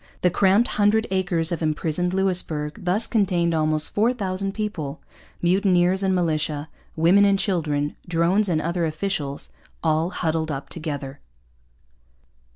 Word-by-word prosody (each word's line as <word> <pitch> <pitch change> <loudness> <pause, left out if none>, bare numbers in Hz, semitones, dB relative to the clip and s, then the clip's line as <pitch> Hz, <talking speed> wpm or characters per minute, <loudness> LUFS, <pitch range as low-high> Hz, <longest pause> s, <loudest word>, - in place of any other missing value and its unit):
The 180 - +3
cramped 200 +5 +3
hundred 215 +2 +2
acres 180 -3 0
of 170 - -2
imprisoned 160 +2 0
Louisbourg 180 -6 -1
thus 200 +6 +1
contained 180 -6 +1
almost 155 -1 +1
4,000 200 -4 0
people 175 -9 -4 0.4
mutineers 185 0 +3
and 190 -1 +1
militia, 155 -3 -1 0.3
women 175 +5 +5
and 200 -1 +4
children, 155 -7 -1
drones 175 +4 +2
and 160 -3 +1
other 170 0 -1
officials, 155 -4 -3 0.3
all 160 +1 +1
huddled 160 -3 -1
up 140 -2 -5
together. 145 -4 -5
175 Hz, 125 wpm, -23 LUFS, 155-195 Hz, 0.4 s, women